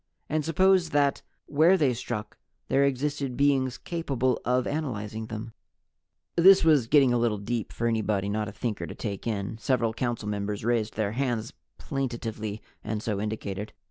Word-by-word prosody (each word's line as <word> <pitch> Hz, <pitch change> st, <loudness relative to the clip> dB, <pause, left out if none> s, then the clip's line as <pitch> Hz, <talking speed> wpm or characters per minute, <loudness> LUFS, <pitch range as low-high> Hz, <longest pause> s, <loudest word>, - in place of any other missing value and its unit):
And 155 Hz, 0 st, 0 dB
suppose 185 Hz, +2 st, +3 dB
that 145 Hz, -2 st, +2 dB, 0.2 s
where 160 Hz, +6 st, +4 dB
they 140 Hz, -7 st, +3 dB
struck 110 Hz, -3 st, -5 dB, 0.3 s
there 140 Hz, -, +4 dB
existed 140 Hz, -1 st, -1 dB
beings 135 Hz, -3 st, +2 dB
capable 135 Hz, -8 st, -1 dB
of 125 Hz, +1 st, +1 dB
analyzing 110 Hz, -7 st, -3 dB
them?" 110 Hz, +1 st, -6 dB, 0.8 s
This 190 Hz, +3 st, +7 dB
was 150 Hz, -7 st, +4 dB
getting 135 Hz, -2 st, +5 dB
a 120 Hz, -, +2 dB
little 115 Hz, -3 st, +1 dB
deep 110 Hz, +2 st, -3 dB
for 115 Hz, -, -3 dB
anybody 110 Hz, -3 st, 0 dB
not 105 Hz, +1 st, -1 dB
a -, -, -7 dB
Thinker 110 Hz, 0 st, -3 dB
to -, -, -8 dB
take 100 Hz, -1 st, -5 dB
in. 105 Hz, 0 st, -3 dB
Several 115 Hz, -3 st, +1 dB
Council 120 Hz, -2 st, -2 dB
members 105 Hz, 0 st, -3 dB
raised 115 Hz, -2 st, 0 dB
their 105 Hz, -2 st, 0 dB
hands 120 Hz, -2 st, -2 dB, 0.2 s
plaintively 115 Hz, -5 st, -4 dB, 0.2 s
and 110 Hz, 0 st, -3 dB
so 105 Hz, -3 st, -1 dB
indicated. 105 Hz, -1 st, -4 dB
120 Hz, 160 wpm, -27 LUFS, 110-140 Hz, 0.8 s, This